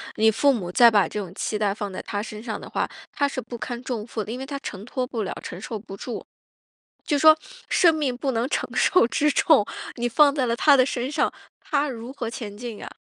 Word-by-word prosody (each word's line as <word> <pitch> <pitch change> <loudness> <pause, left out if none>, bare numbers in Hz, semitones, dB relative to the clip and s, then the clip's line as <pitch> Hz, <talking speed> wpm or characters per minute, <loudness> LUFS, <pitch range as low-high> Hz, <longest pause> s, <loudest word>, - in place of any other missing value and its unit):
你 220 +1 +4
父 280 +6 +3
母 185 -8 -4
再 235 +5 +7
把 205 -5 +4
这 210 - -4
种 185 -4 -6
期 210 - -2
待 205 -2 +1
放 205 -2 -5
在 185 - -5
他 205 0 -3
身 215 -1 -8
上 225 -1 -4
的 - - -9
话， - - -1 0.2
他 285 - +1
是 275 -2 -4
不 240 +1 -8
堪 240 +1 -5
重 235 -4 -4
负 220 -2 -3
的， 215 - -7
因 245 - -5
为 265 - -5
他 280 0 -5
承 200 -4 -7
托 255 +1 -2
不 235 -4 -3
了、 - - -3
承 175 - -7
受 220 +2 -5
不 195 -2 -10
住， 245 - -6 0.8
就 295 - +1
说 315 +1 +8 0.3
生 340 -3 +5
命 290 -5 -1
不 265 +2 -1
能 235 +1 0
承 - - -1
受 365 - +4
之 300 +4 +2
重， 290 -5 +4 0.3
你 240 0 0
放 285 +4 +5
在 265 -4 0
了 235 - 0
他 285 +3 +5
的 255 - +5
身 255 +1 -3
上， 300 - +1 0.3
他 290 -1 0
如 240 0 -7
何 245 -5 -4
前 220 -4 -7
进 235 -2 -6
呀？ - - -8
240 Hz, 270 characters per minute, -24 LUFS, 215-275 Hz, 0.8 s, 说